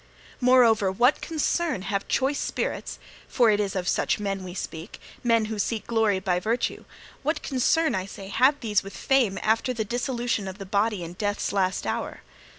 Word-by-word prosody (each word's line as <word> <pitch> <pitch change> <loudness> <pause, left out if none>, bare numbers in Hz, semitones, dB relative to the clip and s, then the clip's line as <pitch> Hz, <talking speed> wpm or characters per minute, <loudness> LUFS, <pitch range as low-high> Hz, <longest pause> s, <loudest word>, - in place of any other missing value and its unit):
Moreover, 235 -6 +5
what 245 +8 +3
concern 320 - -1
have 195 0 -2
choice 275 +2 +1
spirits - - -3 0.3
for 235 -4 +4
it 205 - +2
is 200 -2 -1
of 185 -1 -2
such - - +1
men 195 -2 -3
we 180 -1 -8
speak, 165 0 -7 0.2
men 230 -2 +3
who 215 -1 -4
seek 220 +2 -1
glory 220 -4 +2
by 180 -1 0
virtue 225 +6 -2 0.4
what 310 +4 -1
concern, 310 +5 +2
I 190 0 -2
say, 195 -1 -9
have 265 +7 +3
these 210 -4 +1
with 195 - -10
fame 245 -8 +2
after 225 +3 +1
the 220 -2 -2
dissolution 240 -2 -2
of 190 0 -6
the 195 - -7
body 200 0 0
in 170 +1 -7
death's 205 +2 -2
last 190 -2 0
hour? - - -3
215 Hz, 180 wpm, -26 LUFS, 195-245 Hz, 0.4 s, Moreover